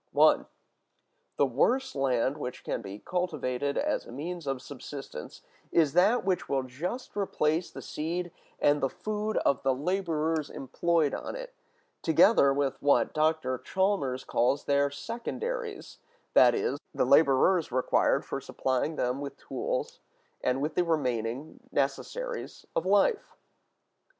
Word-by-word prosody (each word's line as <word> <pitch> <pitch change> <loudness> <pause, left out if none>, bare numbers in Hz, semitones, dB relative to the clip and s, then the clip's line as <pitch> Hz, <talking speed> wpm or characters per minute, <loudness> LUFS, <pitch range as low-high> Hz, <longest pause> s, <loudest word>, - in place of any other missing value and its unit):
(1.) - - +5 0.9
The - - +4
worst 265 +1 +1
land 135 +1 +1
which 125 -3 -5
can - - -3
be 100 -1 -7
cultivated 140 -4 -2
as - - -1
a - - -10
means 165 +4 -5
of 135 -1 -1
subsistence 140 +1 -9 0.3
is 155 -4 +3
that 200 +5 +4
which 185 -3 0
will 135 -1 +1
just 175 - -5
replace 170 -4 0
the - - -9
seed 170 +3 -3 0.3
and 145 0 +3
the 135 - +2
food 215 +4 -3
of 140 - +2
the 135 -1 +2
laborers 160 -1 -1
employed 160 +2 0
on - - -4
it, - - -7 0.5
together 160 -2 +5
with 135 -1 -1
what 145 0 +3
Dr. 155 -5 +1
Chalmers 165 -6 0
calls 125 +4 +1
their 140 0 +2
secondaries; 415 - -5 0.3
that - - +7
is, 435 +2 -1 0.2
the - - +2
laborers 160 +3 +4
required 130 +1 +2
for - - -4
supplying 130 +4 -1
them 125 0 -1
with 140 -1 -6
tools, - - -3 0.4
and 130 +2 +1
with 155 +1 -1
the 180 - +2
remaining 130 -3 -2
necessaries 480 - -3
of - - 0
life. 470 -5 +2
150 Hz, 135 wpm, -29 LUFS, 135-185 Hz, 0.9 s, that